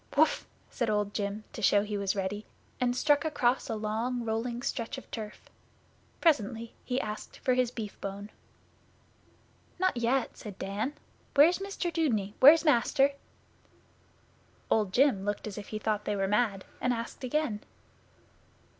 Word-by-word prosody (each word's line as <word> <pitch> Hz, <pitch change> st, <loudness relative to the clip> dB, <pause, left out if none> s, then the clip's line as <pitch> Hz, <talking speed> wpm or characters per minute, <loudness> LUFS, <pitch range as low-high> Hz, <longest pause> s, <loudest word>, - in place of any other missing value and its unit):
'Whuff!' -, -, +3 dB, 0.2 s
said 235 Hz, -4 st, -1 dB
Old 210 Hz, -1 st, 0 dB
Jim, 205 Hz, +1 st, -3 dB
to -, -, -6 dB
show 205 Hz, 0 st, +4 dB
he 210 Hz, 0 st, -4 dB
was 200 Hz, -1 st, 0 dB
ready, 200 Hz, +2 st, -3 dB, 0.3 s
and 245 Hz, -1 st, +1 dB
struck 290 Hz, +2 st, +3 dB
across 270 Hz, -5 st, +1 dB
a 225 Hz, -, -1 dB
long 225 Hz, +3 st, -2 dB
rolling 235 Hz, +2 st, -2 dB
stretch 230 Hz, -1 st, -3 dB
of -, -, -11 dB
turf. 215 Hz, -2 st, -6 dB, 0.8 s
Presently 230 Hz, -, +1 dB
he 250 Hz, 0 st, -1 dB
asked 215 Hz, -3 st, -6 dB
for 255 Hz, -, +1 dB
his 250 Hz, -1 st, +2 dB
beefbone. 205 Hz, -3 st, -6 dB, 1.5 s
'Not 370 Hz, -3 st, +2 dB
yet,' 240 Hz, +2 st, 0 dB
said 205 Hz, -3 st, -9 dB
Dan. 205 Hz, +8 st, -2 dB, 0.4 s
'Where's 320 Hz, +6 st, +6 dB
Mr 390 Hz, -3 st, -3 dB
Dudeney? 220 Hz, -, 0 dB
Where's 315 Hz, +5 st, +8 dB
Master?' 275 Hz, 0 st, +4 dB, 1.6 s
Old 210 Hz, -4 st, +2 dB
Jim 250 Hz, -5 st, +3 dB
looked 205 Hz, 0 st, -2 dB
as 210 Hz, -1 st, -5 dB
if 205 Hz, -, -9 dB
he 215 Hz, -, -4 dB
thought 215 Hz, -1 st, -1 dB
they 210 Hz, -, 0 dB
were 195 Hz, -1 st, 0 dB
mad, 205 Hz, -2 st, +1 dB, 0.2 s
and 250 Hz, -, +2 dB
asked 230 Hz, +3 st, -6 dB
again. 255 Hz, -4 st, 0 dB
230 Hz, 145 wpm, -30 LUFS, 210-260 Hz, 1.6 s, Where's